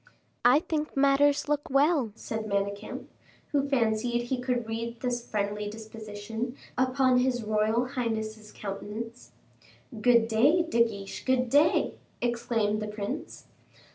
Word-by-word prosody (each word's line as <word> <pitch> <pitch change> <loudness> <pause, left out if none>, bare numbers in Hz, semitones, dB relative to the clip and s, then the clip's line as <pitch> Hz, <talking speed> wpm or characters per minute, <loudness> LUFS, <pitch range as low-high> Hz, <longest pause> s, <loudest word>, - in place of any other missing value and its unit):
"I 250 +5 +6
think 310 -5 -3
matters 280 +1 +4
look 295 0 -1
well," 275 -3 +3
said 220 -1 -4
Manicamp, 200 +1 -2 0.5
who 280 -1 +1
fancied 240 -1 +1
he 250 +1 -2
could 245 -2 -1
read 230 +1 -4
this 245 -2 -1
friendly 205 0 -1
disposition 220 +2 -6 0.2
upon 255 0 +3
his 250 -2 +1
royal 215 +3 +1
highness's 220 -4 -3
countenance. 215 +4 -7 0.7
"Good 235 -1 +5
day, 275 +11 +4
De 235 -9 +3
Guiche, 200 -4 -6
good 255 -2 +1
day," 295 +3 +3 0.2
exclaimed 230 -3 0
the 215 - -3
prince. 210 +6 -5
235 Hz, 125 wpm, -28 LUFS, 215-260 Hz, 0.7 s, I